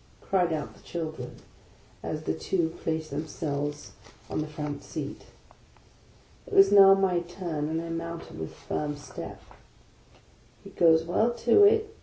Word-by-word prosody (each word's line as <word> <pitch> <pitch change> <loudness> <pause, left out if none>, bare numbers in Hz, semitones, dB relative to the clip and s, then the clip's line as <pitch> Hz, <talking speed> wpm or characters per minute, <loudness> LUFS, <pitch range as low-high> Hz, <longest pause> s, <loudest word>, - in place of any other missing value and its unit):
" - - -31
cried 180 -3 +2
out 155 -2 -3
the - - -19
children, 155 -7 -5 0.7
as - - -4
the 80 - -1
two 160 - 0
placed 160 -1 -2
themselves 145 -1 -4 0.4
on - - -1
the 155 - -3
front 150 -1 -5
seat. - - -6 1.2
It 435 - -5
was 390 0 +7
now 195 -1 +9
my 190 -2 +2
turn, 170 -4 -4
and 160 +1 -1
I 165 0 -5
mounted 165 - -6
with 80 - -5
a - - -17
firm 145 -1 -3
step. 145 - -8 0.6
" - - -29
He - - -11
goes 160 -1 +5
well 180 +7 +2 0.2
to 405 - +7
it 435 +1 +3
165 Hz, 160 wpm, -28 LUFS, 150-185 Hz, 1.2 s, now